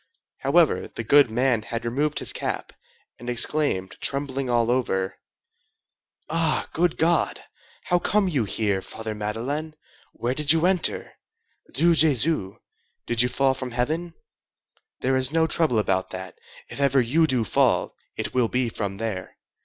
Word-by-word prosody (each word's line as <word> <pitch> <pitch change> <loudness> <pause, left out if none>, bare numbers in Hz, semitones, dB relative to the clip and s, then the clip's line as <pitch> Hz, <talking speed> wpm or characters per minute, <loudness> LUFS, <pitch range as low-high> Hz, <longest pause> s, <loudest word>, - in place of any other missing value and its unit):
However, - - +2
the - - -7
goodman 125 -2 +3
had 115 +1 -5
removed 145 +5 -1
his - - +1
cap, - - -4 0.5
and 120 - -7
exclaimed, 120 -6 +2
trembling 135 -2 -2
all 120 -1 +2
over:— 95 -7 -1 1.1
"Ah, 160 0 0
good 170 0 +1
God! 165 +1 +1 0.4
How 175 - +1
come 205 +2 +1
you 140 -10 0
here, 100 -1 -1
Father 110 +2 -7
Madeleine? 125 +9 -4 0.4
Where 120 +2 -2
did 145 +1 +2
you 165 +1 +4
enter? 185 -2 +1 0.6
Dieu 165 +6 +3
Jésus! 150 - +3 0.5
Did 120 -1 +2
you 125 - +3
fall 135 +1 +2
from 130 -1 -5
heaven? 155 +8 -2 0.9
There 130 +1 +1
is 130 0 +2
no 165 0 +2
trouble 160 -6 +1
about 95 -3 0
that: 95 -2 -7 0.3
if - - -9
ever 140 -1 +3
you 150 +7 +2
do 130 -4 +1
fall, - - +1 0.2
it - - -4
will 125 -2 +2
be 125 0 -1
from 100 -3 -4
there. 100 -4 -5
130 Hz, 145 wpm, -24 LUFS, 115-155 Hz, 1.1 s, you